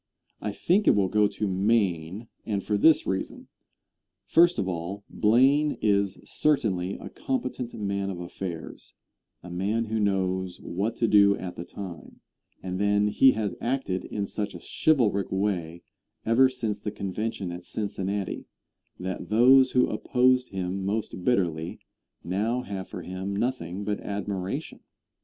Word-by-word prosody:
I 105 - -2
think 185 - +1
it - - +6
will 100 -2 +2
go 105 +1 +4
to 105 - -3
Maine, 95 -1 0 0.2
and 100 -3 -2
for 105 - 0
this 155 +9 +5
reason: 95 0 -4 0.8
First 170 - +5
of 95 - -1
all, 95 +3 -4
Blaine 135 +7 +3
is 100 -2 +1
certainly 100 -11 0
a - - -9
competent 125 -2 -3
man 100 -2 -2
of 90 -3 -5
affairs, 85 -1 -7 0.5
a 90 - -9
man 100 +6 0
who 110 0 -2
knows 95 -2 0
what 105 +6 -2
to 115 - +1
do 100 -1 +5
at 90 -1 -6
the 85 - -5
time; 90 -2 -9 0.4
and 95 0 -3
then 105 0 +3
he 130 +4 +5
has 105 -4 -2
acted 120 -7 -1
in 100 -1 -3
such 100 -1 -3
a - - -7 0.2
chivalric 115 -11 +3
way 90 -4 -2 0.4
ever 125 +4 +5
since 110 -5 -3
the - - -3
convention 105 -1 -4
at 90 0 -7
Cincinnati, 100 -1 -3 0.5
that 95 0 -5
those 130 +4 +6
who 125 -1 +4
opposed 125 0 +2
him 95 0 -3
most 100 -2 -3
bitterly, 85 -8 0 0.5
now 110 +8 -1
have 95 -4 -5
for - - -7
him 95 +2 -4
nothing 100 -5 -2
but 105 0 -2
admiration. 100 -2 -4
100 Hz, 145 wpm, -27 LUFS, 95-115 Hz, 0.8 s, it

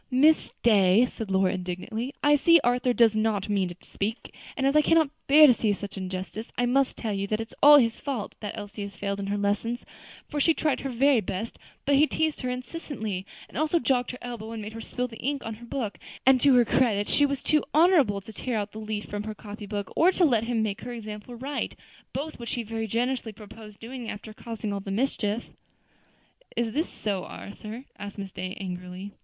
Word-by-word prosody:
"Miss 290 +5 +4
Day," 205 0 +5
said 225 -4 -6
Lora, 190 -1 +2
indignantly, 190 +7 -4
"I 290 0 +6
see 335 +3 +6
Arthur 245 +1 +2
does 230 -3 +4
not 215 -2 0
mean 195 -2 +1
to 175 - -7
speak, 215 +4 -4 0.2
and 270 - 0
as 275 +2 +3
I 305 - +7
cannot 315 -1 +3 0.2
bear 300 +2 +9
to 265 - +8
see 220 -3 +1
such 200 0 -6
injustice, 190 +3 -5
I 245 - +2
must 265 +2 +2
tell 220 -3 -2
you 200 0 -2
that 215 +1 -1
it 225 0 -4
is - - -17
all 295 +1 +10
his 230 -4 +2
fault 265 -7 -4
that 210 - -5
Elsie 205 0 -7
has 200 -1 -6
failed 200 0 -3
in 195 - -3
her 205 +1 -1
lessons; 205 +4 -1 0.4
for 295 - -3
she 320 +3 +4
tried 300 -4 +1
her 275 - -4
very 260 0 +4
best, 205 +4 -5 0.3
but 285 - +3
he 290 +3 +6
teased 315 -1 -1
her 255 - -2
incessantly, 250 - -5 0.2
and - - -6
also 310 +2 +2
jogged 250 -4 +1
her 250 - -5
elbow 230 -2 -6
and 225 - -5
made 215 +1 -7
her 225 - -7
spill 250 +2 -3
the 225 -2 -12
ink 280 0 -2
on 225 - -3
her 230 +2 -11
book; 230 -6 -3 0.3
and 260 -1 +6
to 275 -1 +6
her 245 -1 +6
credit 215 -4 +2
she 290 - +4
was 275 -2 -3
too 305 -1 +3
honorable 300 - +4
to 220 - -11
tear 240 +2 -2
out 205 0 -3
the 215 - -8
leaf 215 -1 -4
from 205 0 -4
her 215 -1 -5
copy 210 0 -9
book, 205 -1 -4
or 350 +3 +5
to 360 -1 +3
let 230 -6 +2
him 230 -2 0
make 205 -2 -2
her 245 - -6
example 215 +1 -7
right; 275 +4 -3 0.4
both 300 +1 -5
which 235 - -5
he 240 - -2
very 225 0 -3
generously 240 +1 -1
proposed 210 0 -12
doing 240 0 -7
after 215 +1 -7
causing 225 -2 -5
all 200 - -2
the 195 - -8
mischief." 215 0 -1 1.1
"Is 230 -2 0
this 315 +5 0
so, 200 -3 -3
Arthur?" 215 +5 -8
asked 205 0 -7
Miss 195 -1 -6
Day, 185 +1 -5
angrily. 180 +1 -6
225 Hz, 225 wpm, -27 LUFS, 205-260 Hz, 1.1 s, all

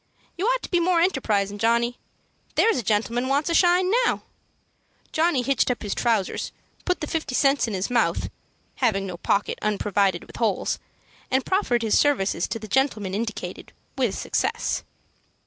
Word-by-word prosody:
You 375 +5 -1
ought - - +1
to - - -7
be 350 - +3
more 345 0 +3
enterprisin', 210 - +1
Johnny. 235 +2 +1 0.6
There's 455 - +3
a - - -1
gentleman 230 +4 0
wants 285 +5 +1
a - - +1
shine 360 +2 +4
now." - - 0 0.9
Johnny 315 -5 +2
hitched 270 0 +1
up 250 - -2
his 205 - -2
trousers, 225 -6 0 0.3
put 360 -1 0
the - - -1
fifty 315 -6 -2
cents 275 -2 +3
in 215 - -3
his 190 +5 -2
mouth, 240 - +1 0.5
having 215 -7 +1
no 180 -2 -6
pocket 200 +3 0
unprovided 200 -3 +1
with - - -13
holes, 220 -5 0 0.5
and 265 0 +1
proffered 250 - +1
his 220 - +3
services 200 - +1
to - - -3
the 220 -1 -9
gentleman 215 -6 0
indicated, 220 +2 -5 0.2
with - - 0
success. - - -1
240 Hz, 165 wpm, -24 LUFS, 210-305 Hz, 0.9 s, shine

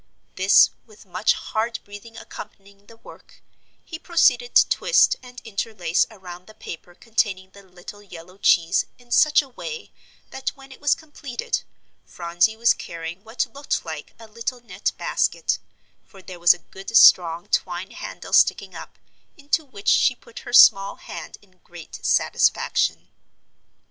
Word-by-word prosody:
This 190 +2 +5
with 215 -2 -19
much 205 +3 +1
hard 225 +1 -3
breathing 205 +3 -12
accompanying 200 -2 -12
the 230 - -16
work, - - -17 0.4
he 320 - -8
proceeded 250 -9 +2
to - - +7
twist - - +3
and 250 0 -12
interlace 200 -6 -1
around 180 -4 -12
the 215 - -15
paper 175 -2 -10
containing 195 -4 -2
the 200 - -15
little 185 +2 -13
yellow 185 -1 -13
cheese 175 -1 +3
in 245 -1 -23
such 300 +3 +4
a 275 - -15
way 465 - -8 0.4
that 265 0 -3
when 270 0 -15
it 265 - -14
was 290 - +3
completed, 310 - -5 0.4
Phronsie 175 +5 -1
was 235 +1 +4
carrying 170 +2 -8
what 225 +2 -2
looked 280 -7 -3
like 155 -2 -8
a 225 - -13
little 230 +3 -5
net 205 -4 -3
basket, - - -1 0.4
for 195 -2 -17
there 185 -2 -10
was 175 +1 +6
a 175 - -20
good 195 +4 -1
strong 170 -1 +6
twine 180 +1 -2
handle - - -9
sticking - - +3
up, - - -11 0.4
into 295 +2 -1
which 230 -8 -13
she 250 - +4
put 235 - -13
her - - -10
small 195 -4 +6
hand 170 -2 -10
in 185 -2 -28
great 175 -2 -12
satisfaction. - - +1
205 Hz, 155 wpm, -22 LUFS, 180-245 Hz, 0.4 s, to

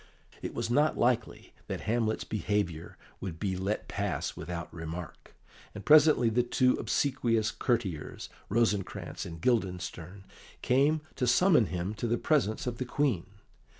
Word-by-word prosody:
It - - -5
was - - -2
not 150 +5 +3
likely 120 -1 0
that - - -4
Hamlet's 110 0 0
behaviour 100 -6 -2 0.2
would 85 -4 -6
be 95 -3 -1
let 95 +3 -2
pass 100 -3 -2
without 85 -1 -6
remark, 80 0 -8 0.4
and 105 - -8
presently 150 -5 +6
the 115 +2 +3
two 125 +1 +2
obsequious 115 -3 +1
courtiers, 105 - -2 0.2
Rosencrantz 105 -3 -1
and 85 -1 -8
Guildenstern, 90 -3 -2 0.4
came 145 +5 +3 0.2
to 125 - 0
summon 150 - +5
him 90 +3 -3
to 115 +2 -3
the 120 +1 +1
presence 125 -9 +1
of 120 -1 -4
the 130 - -2
Queen. 125 -8 0
110 Hz, 140 wpm, -30 LUFS, 95-125 Hz, 0.4 s, presently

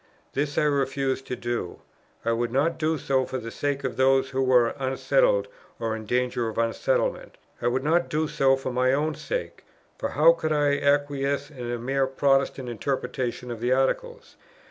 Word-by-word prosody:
This 145 +1 -2
I - - +3
refused 135 -2 0
to 125 - -3
do: 120 -7 -4 0.5
I 115 - +2
would 115 0 -1
not 145 +7 +1
do 160 0 +1
so 130 -1 +1
for 130 - -4
the 115 -2 -6
sake 140 +1 -2
of 130 -4 -3
those 135 0 +3
who 135 0 0
were 125 -3 +4
unsettled - - +2 0.3
or 115 -1 -1
in 110 -1 -8
danger 125 0 0
of 110 - -8
unsettlement. - - 0 0.2
I 120 - +1
would 130 +2 0
not 170 +4 +2
do 155 +1 0
so 135 -2 +3
for 135 -1 -4
my 130 +1 +2
own 155 +3 +1
sake; 85 - -5 0.4
for - - -2
how 155 +4 +6
could 160 -2 -3
I 145 -1 +2
acquiesce 140 0 0
in 125 -4 -6
a 120 - -2
mere 135 +3 0
Protestant 135 -1 +1
interpretation 125 0 -3
of 115 - -5
the 120 +2 +1
Articles? 470 - -1
135 Hz, 185 wpm, -25 LUFS, 125-145 Hz, 0.5 s, how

